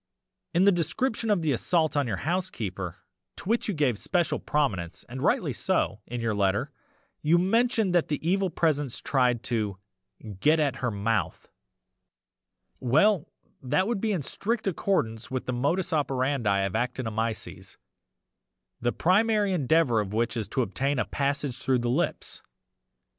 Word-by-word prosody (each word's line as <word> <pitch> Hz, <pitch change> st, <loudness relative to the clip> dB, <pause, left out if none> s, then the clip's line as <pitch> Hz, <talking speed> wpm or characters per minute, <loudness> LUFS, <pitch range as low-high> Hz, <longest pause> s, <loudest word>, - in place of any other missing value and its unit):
"'In 175 Hz, -, +5 dB
the 200 Hz, -, +6 dB
description 210 Hz, -, -1 dB
of 200 Hz, -5 st, +2 dB
the 155 Hz, -, +2 dB
assault 160 Hz, +5 st, +1 dB
on 145 Hz, -3 st, +1 dB
your 100 Hz, -5 st, -2 dB
housekeeper, 110 Hz, -, -3 dB, 0.4 s
to -, -, -10 dB
which 230 Hz, +3 st, +1 dB
you 205 Hz, -, -1 dB
gave 130 Hz, -8 st, +1 dB
special 175 Hz, -4 st, 0 dB
prominence 105 Hz, -, -1 dB
(and 130 Hz, +2 st, -7 dB
rightly -, -, +1 dB
so) 95 Hz, +5 st, 0 dB
in 120 Hz, +1 st, -4 dB
your 115 Hz, -1 st, 0 dB
letter, 100 Hz, +7 st, 0 dB, 0.5 s
you 160 Hz, +3 st, +4 dB
mentioned 220 Hz, +1 st, +2 dB
that 175 Hz, -2 st, +3 dB
the 150 Hz, -, -1 dB
EVIL 190 Hz, +1 st, +2 dB
PRESENCE 145 Hz, -6 st, 0 dB
tried 125 Hz, -3 st, +1 dB
to 105 Hz, -6 st, -2 dB, 0.6 s
"get 155 Hz, +8 st, +4 dB
at 145 Hz, -3 st, +1 dB
her 125 Hz, -, -1 dB
mouth" 110 Hz, +1 st, -2 dB, 1.3 s
well 155 Hz, -, +3 dB, 0.3 s
that 135 Hz, +8 st, +1 dB
would 225 Hz, -4 st, -1 dB
be 220 Hz, -, +1 dB
in 180 Hz, -8 st, -1 dB
strict 220 Hz, -, -2 dB
accordance 140 Hz, -, -1 dB
with 130 Hz, -1 st, -3 dB
the 125 Hz, -, -2 dB
modus 165 Hz, +9 st, 0 dB
operandi 130 Hz, -8 st, +1 dB
of 95 Hz, -1 st, -1 dB
actinomyces, 115 Hz, -2 st, -3 dB, 1.0 s
the 120 Hz, 0 st, +1 dB
primary 205 Hz, -, +2 dB
endeavour 150 Hz, -6 st, +3 dB
of 105 Hz, -1 st, -3 dB
which 115 Hz, +1 st, 0 dB
is 110 Hz, -4 st, -2 dB
to 130 Hz, +5 st, 0 dB
obtain 130 Hz, +8 st, -1 dB
a -, -, +1 dB
passage 140 Hz, -2 st, -1 dB
through 130 Hz, 0 st, +1 dB
the 120 Hz, 0 st, -1 dB
lips. 165 Hz, +7 st, -1 dB
140 Hz, 155 wpm, -27 LUFS, 115-175 Hz, 1.3 s, the